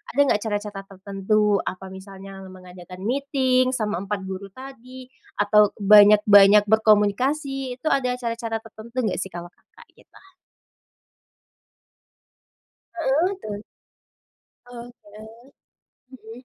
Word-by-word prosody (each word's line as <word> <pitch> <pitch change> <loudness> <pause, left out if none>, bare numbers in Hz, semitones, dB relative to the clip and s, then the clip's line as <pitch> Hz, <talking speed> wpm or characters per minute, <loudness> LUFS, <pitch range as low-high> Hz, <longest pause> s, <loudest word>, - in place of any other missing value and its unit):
ada - - -2
nggak - - +1
cara-cara 205 -1 -4
tertentu, 200 +2 0
apa, 185 +1 -6
misalnya 195 0 -11
mengadakan 185 0 -13
meeting, 255 +1 0
sama 210 -6 -2
4 200 +2 -4
empat 190 - -7
guru 190 +1 -7
tadi, 260 -1 -12 0.2
atau 210 0 +3
banyak-banyak 205 0 +6
berkomunikas,i 250 +6 +1
Itu 310 +5 -3
ada 250 -2 0
cara-cara 230 -2 -5
tertentu 225 +1 -14
nggak 210 -5 -2
sih, 190 - -4
kalau 175 -1 -10
Kakak? - - -22
Gitu. - - -22 2.8
Heeh. 330 +3 0
Betul. 205 -1 -7 1.0
Oke. 235 0 -14 0.6
Mhm. 245 -1 -14
215 Hz, 105 wpm, -22 LUFS, 200-255 Hz, 2.8 s, banyak-banyak